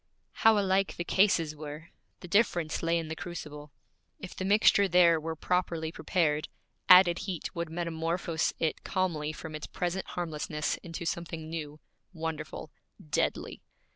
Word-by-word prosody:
How 225 -1 +6
alike 195 -1 +1
the 175 - -2
cases 170 -5 +2
were! 150 +2 -8 0.3
The 180 - -8
difference 175 -5 +1
lay 170 0 +1
in 165 -1 -3
the 160 - -4
crucible. 150 -4 -8 0.5
If 185 - -9
the - - -4
mixture 200 0 +5
there 170 -2 +5
were 160 +1 -4
properly 165 -1 -1
prepared, 160 -2 0 0.4
added 180 -1 +8
heat 185 -6 -5
would 170 -1 -3
metamorphose 165 0 -1
it 160 -2 -1
calmly 170 -6 -1
from 155 +1 -8
its 150 - -6
present 180 +2 -3
harmlessness 155 -3 -3
into 170 0 -7
something 165 -1 -4
new, 155 -2 -6 0.3
wonderful, 160 -2 -5 0.4
deadly. - - -1
165 Hz, 140 wpm, -29 LUFS, 155-180 Hz, 0.5 s, added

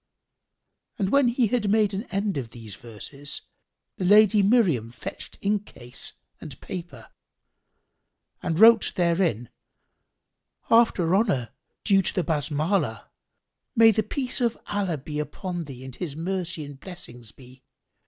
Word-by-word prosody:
'" - - -53
When 280 -2 +4
he 240 +1 +2
had 220 -2 0
made 210 -1 +3
an 200 +5 -3
end 200 -2 -2
of 120 -4 -6
these 110 -4 -10
verses, 120 +6 -7 0.5
the - - -3
Lady 210 +2 +6
Miriam 195 - +3
fetched 120 0 -8
inkcase 200 -12 -3 0.3
and 145 -5 -10
paper 170 - -8 1.3
and 165 - -1
wrote 230 +1 +7
therein: 170 - +1 1.2
"After 225 -7 +4
honour 190 - +1 0.3
due 195 -2 +4
to 185 - -2
the 185 - +1
Basmalah,[FN#2] 155 +4 -1 0.7
may 225 -1 +7
the 220 - +1
peace 260 +2 -3
of 235 -1 +1
Allah 195 -6 -1
be 150 +2 -6
upon 175 +3 -4
thee 130 -2 -10
and 130 -2 -9
His 165 -6 -5
mercy 175 -1 -3
and 140 -1 -11
blessings 125 - -10
be! 130 0 -17
175 Hz, 135 wpm, -25 LUFS, 140-210 Hz, 1.3 s, wrote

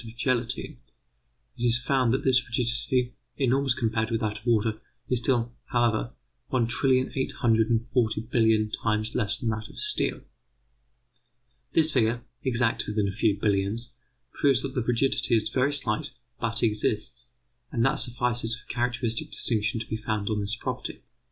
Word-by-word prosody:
of 115 0 -10
gelatine, 125 +2 -1 0.8
it - - -6
is 120 -1 +5
found 125 0 +1
that 135 +3 0
this 130 -1 +4
rigidity, 120 +1 0 0.2
enormous 135 -1 +2
compared 110 -1 0
with 115 -1 0
that 105 -1 -2
of - - -23
water, 110 -1 +1 0.3
is 125 - +3
still, 120 -2 0
however, 115 - +1 0.4
one 125 -3 +1
trillion 130 +2 +2
eight 130 - -1
hundred 115 -3 +2
and 115 -1 +2
forty 120 -3 0
billion 110 -1 +2
times 110 +1 -1
less 110 +1 +1
than 120 -4 -1
that 110 0 -5
of - - -14
steel. 425 0 0 1.5
This 160 -1 +4
figure, 115 -1 +1 0.2
exact 120 -3 0
within 105 -1 0
a - - -1
few 105 0 +1
billions, 105 +4 0 0.4
proves 135 -3 +3
that 135 -1 -4
the 130 - 0
rigidity 120 +1 +2
is 110 0 -1
very 135 +2 +1
slight, 120 -7 -1 0.3
but 115 0 0
exists; 110 +2 0 0.4
and 120 -2 +1
that 135 - +2
suffices 120 -1 0
for 120 - -15
a - - -6
characteristic 120 -2 -1
distinction 110 -1 0
to 110 - -5
be 110 - -3
founded 110 -1 -2
on 105 -1 0
this 100 +2 -1
property. - - -5
115 Hz, 165 wpm, -27 LUFS, 110-125 Hz, 1.5 s, is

